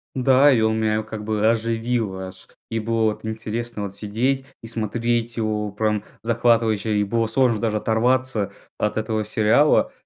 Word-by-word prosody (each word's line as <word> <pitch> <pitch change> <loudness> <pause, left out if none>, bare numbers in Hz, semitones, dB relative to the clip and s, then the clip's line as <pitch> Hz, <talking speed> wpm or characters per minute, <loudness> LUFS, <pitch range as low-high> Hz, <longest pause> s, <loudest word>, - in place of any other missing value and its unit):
Да, 130 +2 +5
и 120 -4 +3
он 110 0 +2
меня 110 0 +1
как 110 -1 -7
бы 110 0 +1
оживил 115 -3 -1
аж. 95 0 -9 0.2
И 115 - -2
было 115 0 0
вот - - -14
интересно 110 0 -4
вот 100 -1 -5
сидеть 125 +7 -1 0.2
и 115 - -9
смотреть 115 +1 -2
его, 105 -2 -1
прям 105 0 -1 0.2
захватывающе 115 -2 +2
и 105 - +2
было, 115 +3 0
сложно 115 0 +2
даже 110 -1 0
оторваться 115 -1 +1 0.3
от 105 - -1
этого 110 -1 -1
сериала 110 +7 +3
110 Hz, 160 wpm, -22 LUFS, 105-120 Hz, 0.3 s, Да